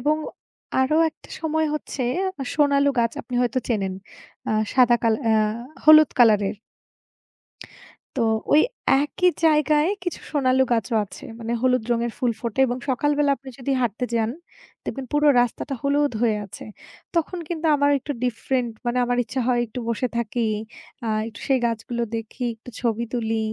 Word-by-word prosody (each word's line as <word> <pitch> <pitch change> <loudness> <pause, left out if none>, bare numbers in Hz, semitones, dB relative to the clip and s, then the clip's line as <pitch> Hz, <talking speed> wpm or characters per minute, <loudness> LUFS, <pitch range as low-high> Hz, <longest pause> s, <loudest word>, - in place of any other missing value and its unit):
এবং 300 +4 +2 0.6
আরো 285 +4 +2
একটা - - -20
সময় 315 0 0
হচ্ছে, 285 -3 -4 0.5
সোনালু 285 -1 +3
গাছ 230 -1 +2
আপনি 250 - -8
হয়তো 245 +1 0
চেনেন। 195 -5 -1 0.6
আ - - +1 0.2
সাদা 245 -2 +5
কাল 225 -1 +3
অ্যা 220 -1 +3 0.5
হলুদ 310 0 +8
কালার 215 -4 +6
এর। 205 - -9 1.6
তো, - - +2 0.3
ওই 305 - +7 0.4
একই 360 +4 +2
জায়গায় 305 0 +4 0.2
কিছু 355 - -3
সোনালু 265 -3 +3
গাছও 225 -1 0
আছে। 195 - -12
মানে 230 0 -4
হলুদ 255 -2 +2
রঙের 235 0 -1
ফুল 245 -3 +1
ফোটে 235 +1 -2
এবং 245 0 -2
সকালবেলা 290 +3 +2
আপনি 265 +1 -11
যদি 275 +1 -2
হাঁটতে 240 +1 -1
যান, 225 -1 +1 0.5
দেখবেন 270 -1 -5
পুরো 295 0 +4
রাস্তাটা 245 +3 -2
হলুদ 285 0 +2
হয়ে 225 -3 +3
আছে। 195 - -10 0.5
তখন 335 +2 0
কিন্তু 330 -1 -2
আমার 285 0 +3
একটু 285 +2 -5
ডিফরেন্ট 245 0 -1 0.2
মানে 240 +1 0
আমার 245 0 0
ইচ্ছা 260 +4 -3
হয় 245 -1 +2
একটু 225 +3 -8
বসে 235 +2 0
থাকি। 235 0 -1 0.6
আ - - -1 0.2
একটু 230 - -12
সেই 270 -1 +4
গাছগুলো 235 +1 -3
দেখি, 225 +3 -6
একটু 240 +2 -12
ছবি 235 -1 0
তুলি। 225 -2 -1
250 Hz, 160 wpm, -23 LUFS, 230-285 Hz, 1.6 s, হলুদ